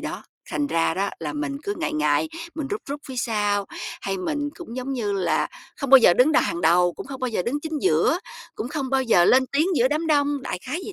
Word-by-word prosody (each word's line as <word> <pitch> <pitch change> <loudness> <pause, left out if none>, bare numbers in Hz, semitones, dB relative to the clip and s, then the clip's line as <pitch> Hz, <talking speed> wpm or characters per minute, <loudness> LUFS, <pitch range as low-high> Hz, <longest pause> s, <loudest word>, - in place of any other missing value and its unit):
đó, - - -6 0.3
thành 290 - 0
ra 165 -9 +1
đó 195 +3 -1
là - - -3
mình 295 -2 -3
cứ 405 +4 -3
ngại 330 - -2
ngại, 150 - +1 0.3
mình 310 -3 -3
rúc 415 - -2
rúc 285 +1 -4
phía 260 - -7
sau. 205 -4 0 0.3
Hay 195 0 -2
mình 290 +10 -2
cũng, 260 -8 -8
giống 255 +2 -3
như 220 -6 -2
là, 175 -5 0 0.3
không 275 -3 -4
bao 270 - +11
giờ 180 -8 +6
đứng 255 - +4
đà 315 - +5
hàng 170 - -2
đầu, 175 +1 +4
cũng - - -9
không 270 -1 -8
bao 255 - 0
giờ 220 -6 -1
đứng 270 +9 -2
chính 315 0 -4
giữa, 375 -2 +3 0.4
cũng 235 - -4
không 275 -2 -3
bao 270 -1 +2
giờ 205 -8 +4
lên 260 +7 +5
tiếng 300 +4 +3
giữa 245 +1 +4
đám 305 +3 -1
đông, 290 -2 +1
đại 260 - -4
khái 300 +8 -3
vậy - - -7
260 Hz, 255 wpm, -24 LUFS, 200-295 Hz, 0.4 s, bao